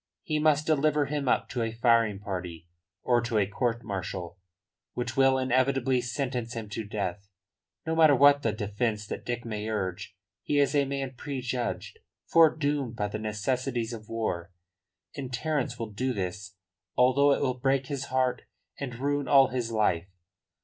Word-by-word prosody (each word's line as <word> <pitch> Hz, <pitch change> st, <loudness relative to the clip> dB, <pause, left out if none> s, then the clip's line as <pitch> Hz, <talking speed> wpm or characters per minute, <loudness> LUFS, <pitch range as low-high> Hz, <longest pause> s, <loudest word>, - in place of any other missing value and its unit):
He 155 Hz, -1 st, -1 dB
must 150 Hz, -1 st, +3 dB
deliver 150 Hz, -1 st, +2 dB
him 140 Hz, -1 st, -3 dB
up -, -, +2 dB
to 125 Hz, -, -2 dB
a 115 Hz, -1 st, -1 dB
firing 115 Hz, -3 st, +3 dB
party 90 Hz, -4 st, -6 dB, 0.4 s
or 120 Hz, -1 st, +3 dB
to 115 Hz, -2 st, -1 dB
a 105 Hz, -, +3 dB
court 115 Hz, +4 st, -1 dB
martial 95 Hz, -2 st, -5 dB, 0.6 s
which 120 Hz, 0 st, -3 dB
will 135 Hz, -1 st, +4 dB
inevitably 130 Hz, 0 st, +2 dB
sentence 125 Hz, -2 st, -3 dB
him 110 Hz, -2 st, -5 dB
to 110 Hz, +2 st, -4 dB
death, 100 Hz, -2 st, -4 dB, 0.6 s
no 160 Hz, 0 st, -1 dB
matter 155 Hz, -3 st, +6 dB
what 145 Hz, +2 st, +6 dB
the 115 Hz, -, +1 dB
defence 105 Hz, +1 st, -2 dB
that -, -, -6 dB
Dick 120 Hz, 0 st, -4 dB
may 110 Hz, -1 st, -4 dB
urge. 95 Hz, -3 st, -3 dB, 0.3 s
He 145 Hz, -, -1 dB
is 140 Hz, 0 st, +3 dB
a 145 Hz, -1 st, +3 dB
man 135 Hz, -1 st, -3 dB
prejudged, 125 Hz, -3 st, -4 dB, 0.3 s
foredoomed 145 Hz, -6 st, +3 dB
by 105 Hz, -2 st, -2 dB
the 110 Hz, -, -4 dB
necessities 115 Hz, +3 st, -2 dB
of 110 Hz, -2 st, -9 dB
war. 95 Hz, -6 st, -3 dB, 0.6 s
And 130 Hz, -2 st, -5 dB
Terence 135 Hz, -1 st, -1 dB
will 115 Hz, -2 st, -5 dB
do 130 Hz, +5 st, -1 dB
this 95 Hz, -1 st, -5 dB, 0.4 s
although 130 Hz, +3 st, +5 dB
it -, -, -1 dB
will 130 Hz, -1 st, -1 dB
break 135 Hz, +1 st, +1 dB
his 135 Hz, -1 st, -4 dB
heart 130 Hz, -1 st, 0 dB, 0.3 s
and 130 Hz, -4 st, -4 dB
ruin 145 Hz, +2 st, -1 dB
all 135 Hz, -2 st, +6 dB
his 125 Hz, -3 st, -2 dB
life. 100 Hz, -6 st, +1 dB
120 Hz, 165 wpm, -28 LUFS, 105-135 Hz, 0.6 s, matter